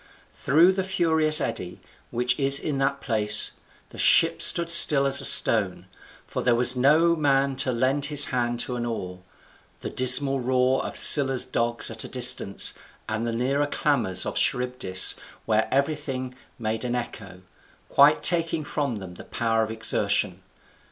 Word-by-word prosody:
Through 165 +7 +2
the 190 0 -3
furious 160 -4 +2
eddy, 90 - -6 0.3
which 125 +2 -1
is 140 0 +2
in 145 -3 -4
that 140 0 -2
place, 105 -4 +2 0.4
the - - -13
ship - - +3
stood 170 0 +3
still 150 -4 +6
as 135 - +1
a - - -2
stone, - - +1 0.4
for - - -6
there 120 -1 +1
was 125 +1 +3
no 155 +6 +2
man 140 -3 0
to 130 - -1
lend 130 +4 -1
his 145 0 +2
hand 120 -1 -2
to 125 - -5
an 120 - -5
oar, 90 -5 -7 0.6
the - - -7
dismal 135 +2 +2
roar 130 +1 -1
of - - -6
Scylla's 135 -3 +1
dogs 115 0 0
at 115 0 -4
a - - -8
distance, 120 -5 +1 0.3
and 110 +2 -4
the - - -3
nearer 135 +5 -2
clamours 125 -11 -1
of - - -5
Charybdis, 125 -7 +2 0.3
where 110 0 0
everything 135 -2 -3 0.2
made 110 -1 -4
an 125 -1 -3
echo, 100 -6 -8 0.4
quite 145 +2 +3
taking 165 -2 0
from 145 -4 -4
them 95 -4 -10
the - - -12
power 115 -1 -2
of 110 - -3
exertion. 110 0 -1
130 Hz, 160 wpm, -23 LUFS, 115-145 Hz, 0.6 s, still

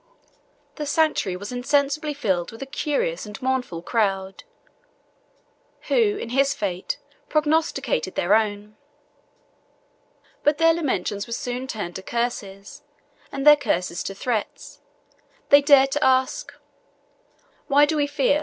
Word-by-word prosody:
The 300 -2 -4
sanctuary 305 - +1
was 205 +5 -7
insensibly 285 +4 0
filled 190 -11 -1
with 225 +4 -8
a - - -6
curious 270 - -2
and 210 -1 -9
mournful 255 -10 -2
crowd, 195 -3 -1 1.5
who, 425 -4 +3
in 235 - -6
his 275 +3 +2
fate, 185 -3 -3 0.3
prognosticated 295 - 0
their 185 +4 +2
own. 210 -1 0 1.7
But 295 0 +3
their 330 +1 +5
lamentations 210 - -2
were 235 - -5
soon 245 +2 -4
turned 205 -8 -5
to - - -8
curses, 200 -3 -4 0.5
and 275 0 -4
their 300 0 +10
curses 180 -10 -2
to 195 - -5
threats: 220 +1 -4 0.7
they 285 0 +8
dared 275 -1 +5
to 295 +2 0
ask, 260 - +1 1.2
"Why 290 0 +5
do 310 +2 -1
we 290 -1 +1
fear? 285 0 +1
255 Hz, 125 wpm, -23 LUFS, 200-290 Hz, 1.7 s, their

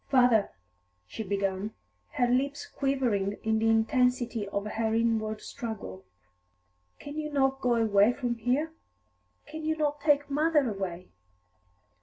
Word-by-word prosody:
"Father," 245 -6 +4 0.6
she 90 - -7
began, 200 0 -2 0.4
her 245 - +2
lips 280 +4 0
quivering 240 -8 -1
in 220 0 +1
the 225 0 +2
intensity 240 -1 +1
of 200 +1 -3
her 220 +1 -1
inward 220 -2 0
struggle, 220 - -7 0.9
"can 290 +2 -7
you 300 0 -4
not 270 -1 +1
go 245 -1 +2
away 215 -1 +4
from 245 -2 -2
here? 250 +7 0 0.7
Can 315 0 -8
you 315 0 0
not 295 -1 -1
take 290 -1 +3
mother 295 -1 +2
away?" 185 -4 -4
235 Hz, 130 wpm, -29 LUFS, 215-280 Hz, 0.9 s, Father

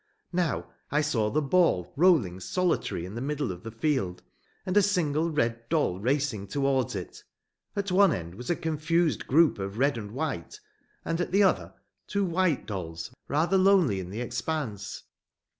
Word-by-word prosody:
Now 175 -3 0 0.2
I 150 +2 +2
saw 115 -8 +1
the 155 +6 0
ball 145 - +2
rolling 140 - +3
solitary 165 - -1
in 95 - -8
the 120 - -5
middle 145 -3 -2
of 90 -1 -8
the 115 - -7
field, 115 - -1 0.4
and 185 - -2
a 205 - +7
single 170 -5 +1
red 115 -6 -1
doll 150 - +1
racing 125 -3 0
towards 135 -1 0
it; 90 -3 -7 0.5
at 200 -1 -2
one 195 0 +5
end 85 - -4
was 120 +6 -8
a 175 - +3
confused 160 +1 0
group 160 -3 +4
of 100 +2 -4
red 140 -1 +2
and 105 -2 -7
white, 130 - -4 0.5
and 165 +1 -1
at - - -2
the 200 +2 +5
other 190 - +1 0.3
two 200 -1 0
white 175 -4 +1
dolls, 85 -3 -5 0.2
rather 170 +6 +2
lonely 185 - +4
in 90 -1 -6
the 105 +5 -5
expanse. 120 -2 -4
145 Hz, 170 wpm, -28 LUFS, 105-170 Hz, 0.5 s, a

